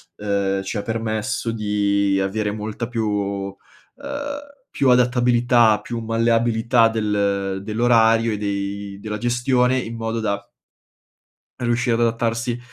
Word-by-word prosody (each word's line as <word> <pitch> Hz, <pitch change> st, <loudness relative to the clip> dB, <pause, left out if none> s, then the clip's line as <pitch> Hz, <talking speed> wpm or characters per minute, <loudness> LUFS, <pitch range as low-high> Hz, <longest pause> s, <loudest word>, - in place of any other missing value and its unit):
uhm, 100 Hz, -1 st, -1 dB
ci 95 Hz, +3 st, -4 dB
ha -, -, -1 dB
permesso 110 Hz, +1 st, -2 dB
di 100 Hz, -2 st, +1 dB
avere 105 Hz, +2 st, -1 dB
molta 110 Hz, +2 st, -4 dB
più 115 Hz, -3 st, -2 dB
uhm, 100 Hz, -1 st, -2 dB, 1.2 s
più 135 Hz, -, +2 dB
adattabilità, 120 Hz, -2 st, +4 dB
più 115 Hz, +2 st, -5 dB
malleabilità 115 Hz, +1 st, +2 dB
del 100 Hz, -3 st, -1 dB
dell'orario 115 Hz, +1 st, +3 dB
e 105 Hz, -, -2 dB
dei 100 Hz, 0 st, -3 dB
della 105 Hz, 0 st, -5 dB
gestione, 125 Hz, +2 st, +2 dB
in 115 Hz, -2 st, -4 dB
modo 115 Hz, 0 st, -3 dB
da 100 Hz, -2 st, -2 dB, 1.2 s
riuscire 120 Hz, 0 st, +1 dB
ad 115 Hz, -, 0 dB
adattarsi 115 Hz, +1 st, 0 dB
110 Hz, 120 wpm, -21 LUFS, 100-120 Hz, 1.2 s, adattabilità